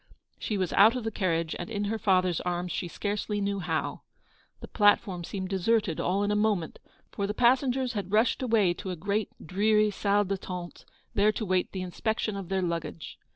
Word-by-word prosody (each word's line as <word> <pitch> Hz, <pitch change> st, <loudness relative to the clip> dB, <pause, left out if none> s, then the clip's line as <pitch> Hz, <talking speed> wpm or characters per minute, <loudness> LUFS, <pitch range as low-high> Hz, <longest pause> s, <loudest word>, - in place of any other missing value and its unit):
She 210 Hz, -, -2 dB
was 185 Hz, -2 st, -1 dB
out 220 Hz, +5 st, +6 dB
of 250 Hz, -, -3 dB
the 225 Hz, -, -2 dB
carriage 170 Hz, -5 st, -1 dB
and 175 Hz, -, -5 dB
in 205 Hz, -2 st, -2 dB
her 220 Hz, +2 st, -2 dB
father's 185 Hz, -4 st, +2 dB
arms 180 Hz, 0 st, -2 dB
she 175 Hz, -, -3 dB
scarcely 205 Hz, +3 st, -3 dB
knew 200 Hz, 0 st, -1 dB
how. 160 Hz, -3 st, -2 dB, 0.6 s
The -, -, -9 dB
platform 205 Hz, -4 st, +2 dB
seemed 190 Hz, +1 st, -5 dB
deserted 195 Hz, -2 st, +1 dB
all 195 Hz, +3 st, +1 dB
in 205 Hz, -, 0 dB
a -, -, +1 dB
moment, 210 Hz, -6 st, 0 dB, 0.3 s
for 200 Hz, -, -2 dB
the 210 Hz, -, -3 dB
passengers 255 Hz, +1 st, +2 dB
had 200 Hz, -3 st, -4 dB
rushed 220 Hz, +5 st, +2 dB
away 220 Hz, -8 st, +3 dB
to 190 Hz, -, -7 dB
a 180 Hz, -, -3 dB
great 200 Hz, +5 st, -1 dB, 0.2 s
dreary 210 Hz, +4 st, +2 dB
salle 205 Hz, +1 st, +1 dB
d'attente, 180 Hz, -2 st, -5 dB, 0.3 s
there 205 Hz, +1 st, +4 dB
to 220 Hz, -, -3 dB
await 185 Hz, -2 st, 0 dB
the 185 Hz, -1 st, -4 dB
inspection 215 Hz, +3 st, -2 dB
of 195 Hz, -3 st, -6 dB
their 190 Hz, -1 st, 0 dB
luggage. 165 Hz, -2 st, -4 dB
200 Hz, 195 wpm, -28 LUFS, 180-215 Hz, 0.6 s, out